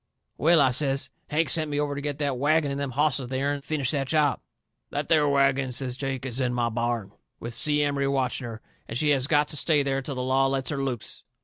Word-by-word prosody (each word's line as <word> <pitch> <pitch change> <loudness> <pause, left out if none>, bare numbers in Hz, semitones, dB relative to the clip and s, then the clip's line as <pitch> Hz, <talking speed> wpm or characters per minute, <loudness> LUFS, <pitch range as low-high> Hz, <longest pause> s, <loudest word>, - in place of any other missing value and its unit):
"Well," 165 +1 +5
I 130 -2 +4
says, 135 0 -1 0.2
"Hank 160 +2 +1
sent 155 -2 +2
me 145 0 -1
over 145 -1 -1
to 140 - -4
get 145 -1 -3
that 140 -4 -1
wagon 150 +1 +2
and 140 - -3
them 140 -1 -2
hosses 145 +1 +2
of 125 -2 -6
theirn 140 +2 -1
and 140 - -13
finish 140 -5 0
that 140 -3 -1
job." 150 -2 +2 0.5
"That 145 0 -3
there 150 -3 +4
wagon," 135 -2 +2
says 125 0 -3
Jake, 135 -1 -4
"is 130 -1 -2
in 125 -2 0
my 120 -1 +1
barn, 115 -3 -2 0.3
with 120 0 -6
Si 150 +5 +2
Emery 140 -1 0
watching 130 -2 -1
her, 110 -1 -8 0.3
and 115 - -4
she 150 +3 +1
has 135 -2 +2
got 150 -1 +3
to 150 - -3
stay 150 -1 +2
there 135 0 -1
till 135 +1 -5
the 125 - -2
law 135 +1 +2
lets 135 -1 -1
her 140 -2 -2
loose." 130 -5 -5
140 Hz, 245 wpm, -26 LUFS, 130-145 Hz, 0.5 s, Well